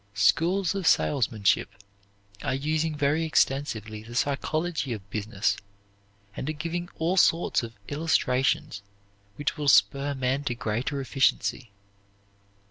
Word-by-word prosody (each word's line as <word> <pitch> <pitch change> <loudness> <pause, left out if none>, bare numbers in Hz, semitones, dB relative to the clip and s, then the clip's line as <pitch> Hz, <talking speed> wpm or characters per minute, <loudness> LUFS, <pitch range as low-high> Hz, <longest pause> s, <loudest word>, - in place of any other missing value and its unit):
Schools 170 - +2
of 195 -4 -2
salesmanship 110 -10 +2 0.7
are 135 -2 -1
using 155 +3 -1
very 150 +2 +1
extensively 125 -8 0
the 115 +2 -11
psychology 145 +2 -1
of 100 -3 -9
business 105 0 -1 0.8
and 135 - -4
are - - -1
giving 170 +3 -4
all 170 +4 0
sorts 170 -1 +3
of 115 -1 -7
illustrations 135 -8 0 0.5
which 145 +5 -2
will 150 -1 -3
spur 140 +1 +4
men 130 +2 -1
to 125 -3 -1
greater 120 +6 -2
efficiency. 130 -2 0
140 Hz, 120 wpm, -27 LUFS, 120-160 Hz, 0.8 s, spur